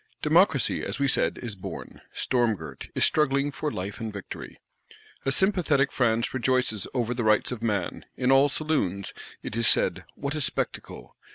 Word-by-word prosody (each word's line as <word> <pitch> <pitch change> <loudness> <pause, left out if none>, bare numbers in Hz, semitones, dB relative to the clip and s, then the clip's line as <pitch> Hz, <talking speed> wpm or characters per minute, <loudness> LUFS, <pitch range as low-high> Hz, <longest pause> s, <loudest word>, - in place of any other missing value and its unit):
Democracy, 160 - +3
as - - -3
we 140 - +1
said, - - +1
is 115 -3 -4
born; 95 - -8
storm 120 -4 +1
girt, 80 -4 -9
is - - +4
struggling 145 -1 +2
for 150 +2 -3
life 95 -1 -5
and 110 -1 -4
victory. 100 -2 -8 0.7
A 135 - +2
sympathetic 160 -5 +3
France 115 -2 +1
rejoices 125 -5 +1
over 120 -1 0
the 120 -1 -2
Rights 110 +2 +3
of 120 -3 -5
Man; 105 -5 -2
in 125 +1 +2
all 135 +2 +5
saloons, 140 - -1 0.3
it - - -5
is 115 -1 +3
said, - - +3
What 140 +1 -4
a 155 - -2
spectacle! - - -4
125 Hz, 170 wpm, -26 LUFS, 110-140 Hz, 0.7 s, all